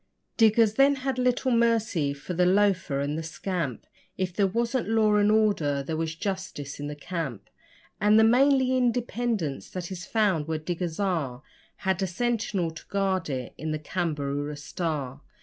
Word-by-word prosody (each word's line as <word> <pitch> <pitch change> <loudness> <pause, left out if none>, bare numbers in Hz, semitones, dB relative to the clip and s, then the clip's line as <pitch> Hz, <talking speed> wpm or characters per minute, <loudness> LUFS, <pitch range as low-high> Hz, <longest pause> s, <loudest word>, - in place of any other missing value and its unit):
Diggers 220 -1 +4
then 275 +3 +5
had 265 -2 0
little 250 +1 +1
mercy 225 -10 +2
for 140 +6 -6
the 180 +1 +3
loafer 185 -7 +2
and 145 +1 -2
the - - -3
scamp 165 - -4 0.3
If 185 -1 -2
there 200 +1 +2
wasn't 235 +3 -1
law 220 -1 +3
and 205 0 +4
order, 185 -11 +2
there 160 +3 -3
was 160 0 -2
justice 185 -7 -4
in 145 - -4
the 150 - -5
camp; 145 - -5 0.5
And 210 +1 +5
the 220 - +7
manly 260 +2 +4
independence 240 - -1
that 180 0 -6
is 180 -2 -6
found 195 -9 +1
where 160 -1 -1
diggers 170 +2 -4
are 155 -10 -1 0.3
Had 190 0 -1
a 190 - +1
sentinel 205 -3 -1
to 160 - -12
guard 190 -4 0
it 130 -3 -4
in 155 +2 -2
the - - -1
CAMBAROORA 150 -3 -3
STAR. 145 -3 -4
185 Hz, 165 wpm, -27 LUFS, 155-220 Hz, 0.5 s, the